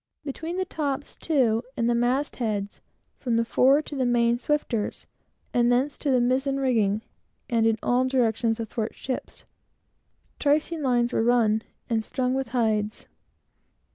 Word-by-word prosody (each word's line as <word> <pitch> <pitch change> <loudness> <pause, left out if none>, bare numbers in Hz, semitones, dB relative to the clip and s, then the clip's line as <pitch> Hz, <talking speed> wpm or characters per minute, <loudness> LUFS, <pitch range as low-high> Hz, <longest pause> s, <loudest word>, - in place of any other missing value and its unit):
Between 320 +5 -4
the 375 - 0
tops, 285 -5 -3
too, 245 -8 +1 0.2
and 235 -1 +1
the 240 - +3
mast 250 +5 0
heads, 205 -4 -3 0.4
from 240 -4 -1
the 230 0 +2
fore 270 +5 +4
to 295 - -7
the 265 - 0
main 240 -1 +2
swifters, 250 -6 -2 0.5
and 240 0 +3
thence 260 +4 +1
to 290 - -2
the 255 -2 +4
mizen 265 +3 +1
rigging, 220 -5 +1 0.5
and 225 -1 +3
in 225 -1 +2
all 250 +1 +2
directions 230 -3 +1
athwartships, 230 +3 -5 0.9
tricing 305 +2 +1
lines 245 -3 +1
were - - +2
run, 225 -2 +3 0.3
and 225 -2 0
strung 255 +1 -1
with 265 -1 -1
hides. 220 -3 0
245 Hz, 145 wpm, -26 LUFS, 230-270 Hz, 0.9 s, fore